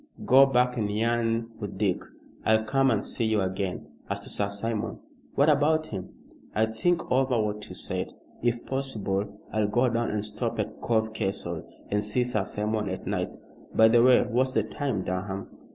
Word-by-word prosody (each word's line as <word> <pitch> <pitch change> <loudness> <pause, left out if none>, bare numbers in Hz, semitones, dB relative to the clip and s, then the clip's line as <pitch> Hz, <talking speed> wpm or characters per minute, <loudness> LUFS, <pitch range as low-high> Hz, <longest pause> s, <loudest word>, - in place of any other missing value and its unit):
Go 135 +2 +7
back 125 -1 +2
and 105 -3 0
yarn 115 +1 0
with 100 -3 -5
Dick, 100 -3 +1 0.4
I'll 110 0 +4
come 135 +5 +3
and - - +1
see 115 - -1
you 110 -2 +2
again. 95 0 -2 0.2
As - - -1
to - - -9
Sir 100 -1 -1
Simon 105 +2 -2 0.2
" - - -29
"What 140 - +4
about 155 +1 +4
him?" 95 -8 -6 0.5
"I'll 110 +1 +2
think 175 +8 0
over 130 -2 +3
what 105 -1 -2
you - - -8
said. - - -4 0.3
If 120 0 0
possible 105 -7 -2
I'll 110 -1 +2
go 120 +4 +2
down 115 0 0
and 105 0 -1
stop 105 - -3
at - - -3
Cove 110 -1 +1
Castle, 95 -6 -3 0.2
and 105 0 +1
see 105 +4 +1
Sir 110 -5 -1
Simon 105 0 -1
at 95 - -5
night. - - -2 0.4
By 110 0 +7
the 120 +1 +6
way, 125 +1 +6
what's 130 +2 +1
the 110 - +2
time, 110 -2 -2
Durham?" 95 +2 -3
110 Hz, 185 wpm, -27 LUFS, 105-125 Hz, 0.5 s, Go